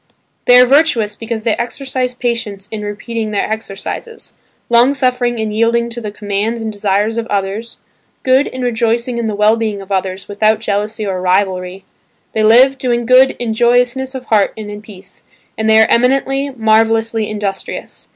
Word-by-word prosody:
They 245 - +7
are 250 - +7
virtuous 250 -7 +2
because 225 0 -5
they 225 -2 +1
exercise 255 +1 -3
patience 225 -5 -3
in 220 -1 -5
repeating 215 +2 -4
their 205 -1 -1
exercises, 220 - -6 0.3
long 240 +4 +4
suffering 250 -3 0
in 220 -1 -2
yielding 230 +2 +1
to 240 +1 -6
the 215 - -4
commands 205 +2 -3
and 220 -1 -4
desires 205 +2 0
of 230 - -4
others, 205 +2 -3 0.5
good 260 +2 +3
in 255 0 -6
rejoicing 235 0 0
in 230 - -1
the 215 - -2
well 210 +2 +4
being 220 -3 -2
of 195 0 -11
others 190 0 -2
without 215 +1 +1
jealousy 210 0 -2
or 185 -2 -3
rivalry; 185 0 -1 0.5
they 220 - 0
live, 255 +5 +5
doing 240 -2 0
good 255 +2 +5
in 230 -2 -2
joyousness 245 +3 +1
of 255 -1 -6
heart 210 -3 +2
and 210 -1 -7
in 205 0 -8
peace, 195 -3 -14 0.3
and 220 0 -1
they 220 0 +6
are 220 - +6
eminently, 270 +3 +1
marvellously 225 -2 +1
industrious. 205 -2 -5
225 Hz, 170 wpm, -15 LUFS, 210-245 Hz, 0.5 s, They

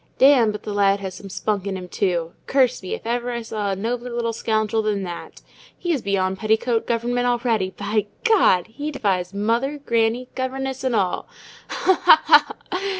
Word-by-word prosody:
"Damme, 260 -5 +6
but 210 - -7
the 210 - -4
lad 200 0 +3
has 190 -1 -5
some 195 +2 -10
spunk 200 0 -2
in 195 -1 -2
him, 180 -1 -8
too. 175 -3 -1 0.2
Curse 260 -2 +2
me, 185 - -4
if - - -13
ever 240 +1 -1
I 235 -1 -3
saw 215 -2 -3
a 195 - 0
nobler 240 +5 -3
little 235 -1 -2
scoundrel 220 -1 0
than 210 -2 -1
that. 175 -2 -8 0.3
He's 335 -7 -1
beyond 190 -2 -1
petticoat 220 +1 +1
government 245 +1 0
already: 235 -5 +1
by 205 +1 -1 0.2
God! 390 - +4
he 285 +7 -6
defies 190 -10 -1
mother, 230 +8 0
granny, 235 -2 0
governess, 265 0 -3
and 255 -3 0
all! 185 -4 0 0.4
Ha, 375 - +1 0.2
ha, - - +7
ha! - - -8
225 Hz, 180 wpm, -22 LUFS, 200-245 Hz, 0.4 s, ha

